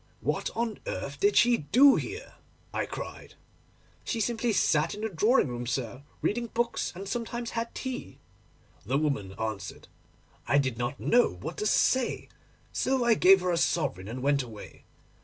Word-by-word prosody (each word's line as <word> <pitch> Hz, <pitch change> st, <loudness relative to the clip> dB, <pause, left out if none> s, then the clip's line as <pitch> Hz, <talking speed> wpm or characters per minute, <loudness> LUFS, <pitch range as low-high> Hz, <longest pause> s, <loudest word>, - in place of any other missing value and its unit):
"What -, -, -1 dB
on 230 Hz, -1 st, -2 dB
earth -, -, -4 dB
did 405 Hz, +1 st, +3 dB
she 240 Hz, 0 st, +5 dB
do 265 Hz, -, +6 dB
here?" -, -, -5 dB, 0.4 s
I -, -, -1 dB
cried. -, -, -8 dB, 0.7 s
"She 230 Hz, -, -2 dB
simply 230 Hz, +2 st, 0 dB
sat 160 Hz, -5 st, +2 dB
in 210 Hz, -, -8 dB
the 220 Hz, -, -1 dB
drawing 210 Hz, -, +3 dB
room, 120 Hz, -1 st, -5 dB
sir, 125 Hz, 0 st, -3 dB, 0.2 s
reading 235 Hz, +2 st, 0 dB
books, 235 Hz, +1 st, -1 dB
and 195 Hz, +2 st, -7 dB
sometimes 235 Hz, +2 st, -4 dB
had 230 Hz, 0 st, -4 dB
tea," 260 Hz, -1 st, -5 dB, 0.7 s
the 130 Hz, +6 st, 0 dB
woman 135 Hz, -11 st, -1 dB
answered. 100 Hz, -2 st, -5 dB, 0.6 s
I 140 Hz, -, +3 dB
did 130 Hz, -4 st, 0 dB
not 120 Hz, +4 st, -3 dB
know 245 Hz, +1 st, +4 dB
what -, -, -7 dB
to 425 Hz, -, 0 dB
say, 260 Hz, -2 st, +1 dB, 0.4 s
so 260 Hz, -1 st, +1 dB
I 235 Hz, -, +5 dB
gave 195 Hz, -2 st, +6 dB
her 180 Hz, 0 st, 0 dB
a 170 Hz, -, +1 dB
sovereign 100 Hz, -, 0 dB
and 125 Hz, +4 st, -6 dB
went 140 Hz, 0 st, +3 dB
away. 115 Hz, -5 st, -11 dB
190 Hz, 165 wpm, -28 LUFS, -, 0.7 s, do